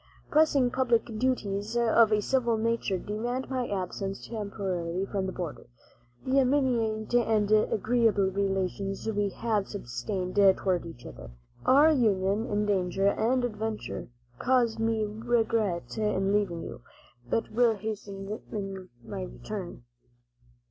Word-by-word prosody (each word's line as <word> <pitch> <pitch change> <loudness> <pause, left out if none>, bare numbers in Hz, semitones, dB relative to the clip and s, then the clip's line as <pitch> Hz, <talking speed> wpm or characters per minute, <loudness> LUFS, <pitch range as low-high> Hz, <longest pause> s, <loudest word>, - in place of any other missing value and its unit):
"Pressing 290 -5 +4
public 240 -3 +2
duties 215 -3 -1
of 230 -1 +4
a 210 -1 +2
civil 240 -2 +1
nature 230 -3 0
demand 240 +8 -3
my 255 -2 -1
absence 195 0 -4
temporarily 195 -5 -3
from 195 -1 -2
the - - -3
border. 175 -5 -6 0.6
The 265 +1 +3
intimate 245 -5 +1
and 220 -3 +2
agreeable 215 -1 +3
relations 195 +1 -2
we 205 -2 0
have 210 0 -1
sustained 185 - -4 0.2
toward 180 -3 0
each 125 -7 -11
other, 65 +1 -9 0.4
our 290 +4 +7
union 210 -4 +2
in 210 -1 0
danger 195 -1 +1
and 245 +4 +1
adventure, 220 -1 -4 0.3
cause 245 -3 +2
me 225 -1 +1
regret 220 -4 0
in 200 -2 +1
leaving 195 -5 0
you, - - -8 0.5
but 230 - -1
will 230 0 +3
hasten 195 -2 -6
my - - -6
return. - - -7
210 Hz, 120 wpm, -28 LUFS, 195-235 Hz, 0.6 s, our